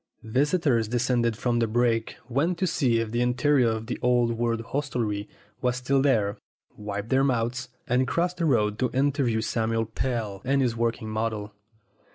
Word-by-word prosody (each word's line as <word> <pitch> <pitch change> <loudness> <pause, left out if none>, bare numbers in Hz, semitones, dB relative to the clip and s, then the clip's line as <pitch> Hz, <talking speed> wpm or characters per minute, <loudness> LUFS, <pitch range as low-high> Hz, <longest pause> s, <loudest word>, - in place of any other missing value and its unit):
Visitors 130 - +1
descended 120 -1 +1
from 120 0 0
the 115 - +2
brake, 115 0 +1
went 150 +8 0
to 185 - 0
see 135 -9 +2
if 115 -1 -2
the 120 +1 0
interior 125 +1 +3
of 110 0 -3
the 125 - -4
old 120 -1 +3
world 115 0 -1
hostelry 115 -5 -2 0.3
was 125 -1 +1
still 135 +2 +1
there, 110 -8 +1 0.4
wiped 105 +1 -5
their 135 0 +3
mouths, 125 -1 0 0.2
and 125 +1 +2
crossed 175 +4 0
the 170 - 0
road 105 -7 +2
to 125 - +1
interview 135 -4 +1
Samuel 115 0 0
Pell 110 -3 -3
and 135 +2 +1
his 125 -4 +1
working 115 -1 -1
model. 110 -1 -3
120 Hz, 170 wpm, -26 LUFS, 115-130 Hz, 0.4 s, interior